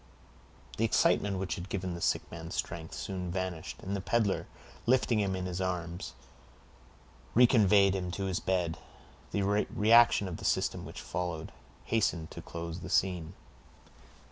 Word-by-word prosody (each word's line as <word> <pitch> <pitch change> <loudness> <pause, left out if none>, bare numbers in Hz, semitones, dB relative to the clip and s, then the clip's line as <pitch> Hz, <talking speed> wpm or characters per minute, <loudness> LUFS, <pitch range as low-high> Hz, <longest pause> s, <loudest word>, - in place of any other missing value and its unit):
The 110 - +1
excitement 100 -3 +3
which 95 0 -2
had 90 +2 -6
given 95 -2 -2
the 85 - -6
sick - - +1
man 80 0 -7
strength, 85 -1 -4
soon 90 -2 -4
vanished, 90 -3 -4
and 100 +2 -2
the 100 - -2
peddler, 105 -1 +1 0.4
lifting 120 -2 +3
him 100 -2 0
in 90 0 -3
his 90 0 -3
arms, 90 -1 -3 1.2
reconveyed 105 -5 +6
him 90 -2 -2
to 95 - -2
his 95 -2 -1
bed. 90 -3 -1 0.5
The 100 - 0
reaction 105 +2 +4
of 85 -3 -5
the - - -10
system - - 0
which - - -8
followed 85 -2 -4 0.3
hastened 90 -8 0
to - - -7
close 85 0 -6
the - - -8
scene. 90 -3 +1
95 Hz, 150 wpm, -31 LUFS, 85-100 Hz, 1.2 s, reconveyed